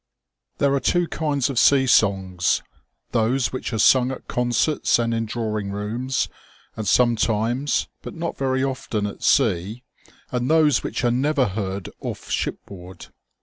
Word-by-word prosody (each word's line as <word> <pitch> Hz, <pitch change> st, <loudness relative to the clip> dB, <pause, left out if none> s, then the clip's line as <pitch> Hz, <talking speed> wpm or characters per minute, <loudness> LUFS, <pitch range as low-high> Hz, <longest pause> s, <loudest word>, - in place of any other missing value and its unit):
Thebe 140 Hz, -1 st, +2 dB
are 140 Hz, -, +2 dB
two 175 Hz, +4 st, +1 dB
kinds 145 Hz, -5 st, -1 dB
of 135 Hz, -4 st, 0 dB
sea 135 Hz, -2 st, +5 dB
songs, 95 Hz, -6 st, +2 dB, 0.5 s
those 120 Hz, +1 st, +1 dB
which 130 Hz, -, -4 dB
are 110 Hz, -, -2 dB
sung 125 Hz, +4 st, +5 dB
at 130 Hz, -, -8 dB
concerts 125 Hz, +5 st, +1 dB
and 115 Hz, -1 st, 0 dB
in 115 Hz, -1 st, -1 dB
drawing 110 Hz, -3 st, -3 dB
rooms, 115 Hz, +6 st, -2 dB, 0.5 s
and 110 Hz, -2 st, -4 dB
sometimes, 120 Hz, +3 st, +1 dB
but -, -, -8 dB
not 170 Hz, 0 st, -4 dB
very 130 Hz, -1 st, 0 dB
often, 130 Hz, -6 st, -2 dB
at 105 Hz, -, -6 dB
sea, 100 Hz, +8 st, +1 dB, 0.5 s
and 125 Hz, 0 st, -1 dB
those 155 Hz, -2 st, +4 dB
which -, -, -4 dB
are 120 Hz, -, +3 dB
never 135 Hz, +2 st, +1 dB
heard 95 Hz, -1 st, -4 dB
off -, -, -7 dB
shipboard. 90 Hz, -2 st, -5 dB
120 Hz, 145 wpm, -22 LUFS, 105-135 Hz, 0.5 s, sea